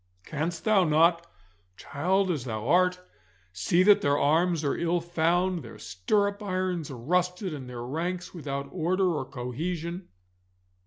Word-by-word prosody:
Canst 165 +2 -3
thou 215 -3 +4
not, 170 +2 +3 0.5
child 185 +6 0
as 145 -7 -3
thou 110 -1 -4
art, 180 +3 +3 0.5
see 135 - +2
that 205 +1 +6
their 145 0 +2
arms 160 +3 +2
are 140 - 0
ill 170 +1 0
found, 175 +1 0
their 115 -4 -11
stirrup 200 - -1
irons 185 -5 -2
rusted, 180 - -1
and 130 -4 -7
their 120 -1 -6
ranks 175 +7 -3
without 140 -4 -4
order 180 +4 +1
or 145 -4 -2
cohesion? 165 +8 -4
170 Hz, 140 wpm, -27 LUFS, 140-180 Hz, 0.5 s, that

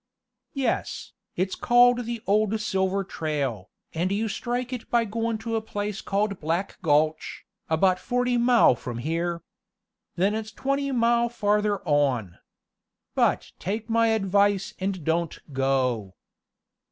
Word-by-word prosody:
"Yes, 270 -2 -2 0.2
it's 185 +2 -1
called 245 0 +4
the 235 -1 -5
old 215 +2 +2
silver 195 -2 0
trail, 140 - -3 0.2
and 175 +4 -1
you 215 +3 0
strike 245 +3 -3
it 245 - -6
by 235 -1 +2
goin' 225 +1 -2
to 225 +1 -4
a 225 - 0
place 205 -1 -4
called 200 -1 -1
Black 165 +5 -2
Gulch, 155 -1 +1 0.2
about 185 +3 +3
forty 245 +2 0
mile 240 - +5
from 120 0 -6
here. 170 +5 -2 0.7
Then 195 +4 +2
it's 220 0 -4
twenty 275 +4 -1
mile 235 -1 +2
farther 210 -3 0
on. 135 - +1 0.7
But - - +1
take 215 +4 -3
my 230 0 +4
advice 200 -2 +2
and 190 -3 -2
don't 165 +1 0 0.2
go." 130 -7 0
200 Hz, 130 wpm, -25 LUFS, 165-230 Hz, 0.7 s, mile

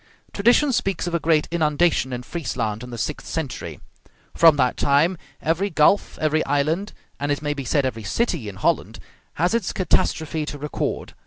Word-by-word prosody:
Tradition 245 +7 +3
speaks 195 -7 -1
of 175 - -4
a 170 - +2
great 160 -2 +2
inundation 155 -3 +1
in 125 0 -4
Friesland 120 -8 -3
in 125 - -8
the 120 - -7
sixth 135 +6 -4
century. 115 - -5 0.5
From 165 -2 +6
that 130 -3 +1
time 150 +6 +2 0.3
every 170 +6 +1
gulf, 160 +4 +2
every 155 0 +1
island, 155 +8 0 0.3
and 145 +1 -1
it 145 +1 -2
may 145 0 0
be 140 -2 -6
said 140 +2 +1
every 115 -4 -3
city, 135 - -1
in 100 - -9
Holland - - 0 0.4
has 175 +6 +1
its 230 -5 0
catastrophe 160 -3 0
to 145 - -5
record. 145 0 -4
150 Hz, 175 wpm, -23 LUFS, 135-170 Hz, 0.5 s, From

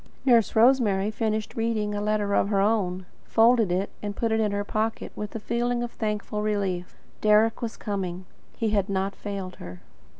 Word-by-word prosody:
Nurse 235 -5 +4
Rosemary 220 -4 +4
finished 215 -1 -2
reading 225 -2 -1
a 205 - -2
letter 210 -1 0
of 200 - +2
her 200 -2 +2
own, 195 -3 +1 0.2
folded 225 -3 +4
it, 190 +3 -1
and 205 -1 -4
put 230 +2 -1
it 220 - +2
in 215 -2 +1
her 205 0 -1
pocket 215 +2 -2
with 210 +1 -6
a - - -2
feeling 240 +2 -1
of 240 - -4
thankful 210 -1 -3
relief. 195 -4 -2 0.2
Deryck 215 +1 +4
was 230 -2 -4
coming. 185 -3 -4 0.3
He 225 -2 0
had 200 -1 +1
not 195 0 -1
failed 195 -3 -6
her. 90 0 -10
210 Hz, 180 wpm, -26 LUFS, 200-225 Hz, 0.3 s, Nurse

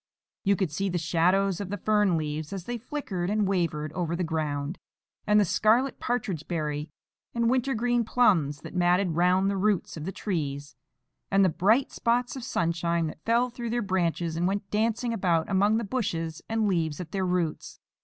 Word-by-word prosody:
You 200 +1 +3
could 185 -4 -1
see 195 +6 -1
the 175 - -1
shadows 180 +4 +2
of 195 - -5
the 205 - -3
fern 210 -3 +2
leaves, 155 0 -3
as 195 -3 -5
they 240 +4 -4
flickered 215 - -4
and 210 -1 +1
wavered 165 -5 -1
over 170 -2 -2
the 180 - -1
ground, 155 -1 -2 0.5
and 210 0 +5
the 205 - +4
scarlet 230 +9 +2
partridge 200 -10 -2
berry 150 -3 -2 0.5
and 235 0 +2
winter 260 +1 +1
green 240 +1 +1
plums 170 - +2
that - - -9
matted 180 +1 +2
round 180 +3 +3
the 200 0 0
roots 200 -3 0
of 155 - -6
the 190 - -3
trees, 145 -8 -4 0.5
and 195 0 +4
the - - +4
bright 215 - +2
spots 245 +2 0
of 260 - -6
sunshine 170 -3 0
that 155 0 -7
fell 235 +2 +2
through 235 -1 -5
their 240 0 0
branches 175 -3 0
and 175 +2 +1
went 200 +1 -3
dancing 230 +2 0
about 175 -6 +1
among 205 +3 +3
the 230 - -1
bushes 170 -9 -2
and 225 -1 +1
leaves 165 -6 0
at 170 -3 -7
their 190 -1 -1
roots. 180 -4 -2
190 Hz, 190 wpm, -27 LUFS, 165-215 Hz, 0.5 s, and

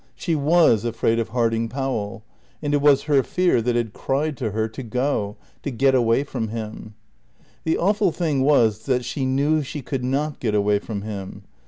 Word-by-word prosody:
She 170 - -2
was 150 -6 +4
afraid 115 0 0
of 115 -1 -2
Harding 115 -1 0
Powell; 110 -5 -3 0.4
and 145 -1 -2
it 145 - +2
was 145 -2 +5
her 145 -3 +3
fear 180 -2 +1
that 120 +1 0
had 115 -3 -1
cried 145 +3 -1
to 115 -3 -2
her 110 +2 -1
to 110 +4 -8
go, 120 -3 -1 0.2
to - - -3
get 135 +1 +2
away 120 +1 +3
from 125 -5 -4
him. 110 -1 -7 0.7
The 160 - +1
awful 200 0 +2
thing 155 -5 0
was 115 -7 +3
that 125 -2 +1
she 130 +2 -2
knew 145 +4 +2
she 145 0 -6
could 130 0 -3
not 140 +4 -1
get 110 -4 -1
away 105 0 +2
from 100 -1 -6
him. 100 -3 -7
125 Hz, 190 wpm, -23 LUFS, 110-145 Hz, 0.7 s, was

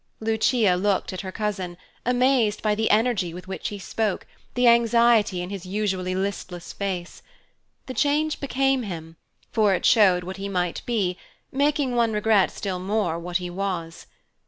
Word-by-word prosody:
Lucia 220 -1 +2
looked 190 +1 0
at 185 - -4
her 190 -1 -6
cousin, 190 -4 -3 0.3
amazed 250 -3 +2
by 215 -1 +2
the 220 +1 0
energy 210 -6 +2
with 180 +1 -9
which 190 - -4
he 205 - -6
spoke, 210 +1 -2 0.3
the 245 0 +3
anxiety 235 -5 +4
in 180 - -7
his 195 -3 -6
usually 185 -1 -2
listless 190 -2 -4
face. 185 -3 -4 0.6
The 260 - -6
change 300 +3 +1
became 270 -1 +1
him, 165 -6 -7 0.4
for 210 -4 +3
it - - -3
showed 190 -6 +5
what 185 +2 -6
he 200 +1 -4
might 180 -3 -1
be, 195 -7 0 0.3
making 285 -1 +1
one 230 -2 +2
regret 210 -2 +3
still 190 -3 -4
more 185 -3 -1
what 175 +1 -2
he 180 -1 -6
was. 175 -3 -4
205 Hz, 160 wpm, -24 LUFS, 185-235 Hz, 0.6 s, showed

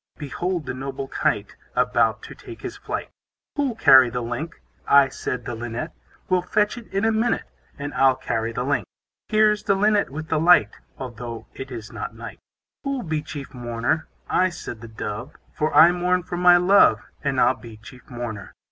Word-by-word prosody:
Behold 170 +3 -3
the - - -3
noble 135 +1 -5
Kite, - - -1 0.2
About - - +2
to - - -9
take - - -12
his - - -5
flight. - - -5 0.4
Who'll 280 -5 0
carry 130 - +7
the 125 +1 -3
link? 120 +8 -5 0.3
I, 140 -1 +6
said 125 -2 -4
the - - -4
Linnet, 120 +6 -5 0.4
Will 185 -1 +2
fetch 210 +3 +1
it 240 -2 -10
in 195 +3 0
a 225 - +3
minute, 225 +2 +1 0.3
And 145 +1 -5
I'll 135 -1 +4
carry 115 -3 -2
the 125 +2 -3
link. 140 +2 0 0.4
Here's 215 -1 +3
the 200 - +2
Linnet 205 +1 +2
with 155 +3 -7
the 160 - +1
light, 175 +3 +5 0.3
Although 120 -2 -7
it 135 0 -8
is 115 -4 -8
not - - -6
night. - - -9 0.4
Who'll 275 -3 -2
be 155 -2 -2
chief 145 -1 -8
mourner? 120 +5 -2 0.2
I, 185 0 +2
said 145 -10 -8
the 115 - -8
Dove; 110 +4 -6 0.2
For 155 +1 -1
I 170 +2 +8
mourn 180 0 +1
for 175 - -5
my 175 0 +6
love; 180 - +5 0.2
And 140 -3 0
I'll 130 - +5
be 115 -4 -12
chief 125 +4 -15
mourner. 120 -4 -6
140 Hz, 185 wpm, -23 LUFS, 120-180 Hz, 0.4 s, I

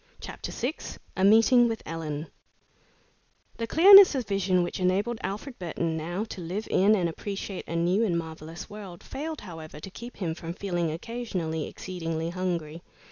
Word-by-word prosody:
CHAPTER - - -7
VI 250 +6 -2 0.4
A 190 - 0
MEETING 225 +4 +6
WITH 225 -1 -3
ELLEN 155 -2 -4 1.3
The 230 - -3
clearness 385 - +9
of 255 -3 -1
vision 190 -3 +1
which 175 - -4
enabled 200 +6 +1
Alfred 225 +7 -5
Burton 165 -2 -2
now 175 +5 -3
to 205 -4 -7
live 185 +6 -4
in 205 +3 +5
and 180 -4 +1
appreciate 195 +2 -5
a 170 - -4
new 175 +6 +2
and 180 -6 +1
marvelous 160 0 -7
world, 200 -5 -10
failed, 310 +2 -5
however, 160 -5 -9
to 195 - -8
keep 235 +5 -10
him 170 -5 -2
from 165 +1 -7
feeling, 175 -5 -1
occasionally, 170 -5 -3
exceedingly 165 -2 -4
hungry. 170 -3 -3
185 Hz, 160 wpm, -27 LUFS, 165-220 Hz, 1.3 s, clearness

